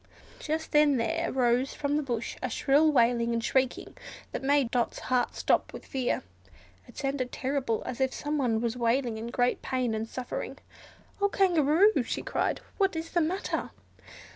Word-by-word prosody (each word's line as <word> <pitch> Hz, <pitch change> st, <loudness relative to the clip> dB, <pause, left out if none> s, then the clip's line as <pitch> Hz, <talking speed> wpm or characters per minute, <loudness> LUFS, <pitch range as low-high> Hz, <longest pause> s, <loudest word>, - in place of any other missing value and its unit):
Just 320 Hz, +1 st, -3 dB
then 295 Hz, -2 st, +5 dB
there 230 Hz, -2 st, 0 dB
arose 250 Hz, +1 st, +1 dB
from 285 Hz, 0 st, -1 dB
the 300 Hz, -, +2 dB
bush 240 Hz, -5 st, -3 dB
a 255 Hz, -, -2 dB
shrill 290 Hz, +6 st, +3 dB
wailing 235 Hz, -3 st, +3 dB
and 230 Hz, -1 st, -1 dB
shrieking 260 Hz, +1 st, 0 dB, 0.4 s
that -, -, -4 dB
made 275 Hz, -3 st, +2 dB
Dot's 240 Hz, -1 st, 0 dB
heart 250 Hz, -1 st, 0 dB
stop -, -, +1 dB
with -, -, -9 dB
fear. 260 Hz, -2 st, -1 dB, 0.6 s
It -, -, -16 dB
sounded 270 Hz, -2 st, -2 dB
terrible, 260 Hz, -4 st, -1 dB
as 255 Hz, +1 st, -5 dB
if 265 Hz, 0 st, +2 dB
something 270 Hz, -8 st, -1 dB
was 235 Hz, 0 st, -1 dB
wailing 235 Hz, -1 st, 0 dB
in 225 Hz, -, -5 dB
great 245 Hz, +1 st, 0 dB
pain 255 Hz, -3 st, -1 dB
and 220 Hz, +1 st, -3 dB
suffering. 255 Hz, -1 st, -5 dB, 0.6 s
"Oh 405 Hz, -, +3 dB
Kangaroo!" 360 Hz, +1 st, +4 dB
she -, -, -3 dB
cried, -, -, -1 dB, 0.2 s
"what 390 Hz, -3 st, +2 dB
is 325 Hz, +1 st, -4 dB
the 345 Hz, -, +2 dB
matter?" 355 Hz, +5 st, -2 dB
260 Hz, 165 wpm, -28 LUFS, 240-295 Hz, 0.6 s, then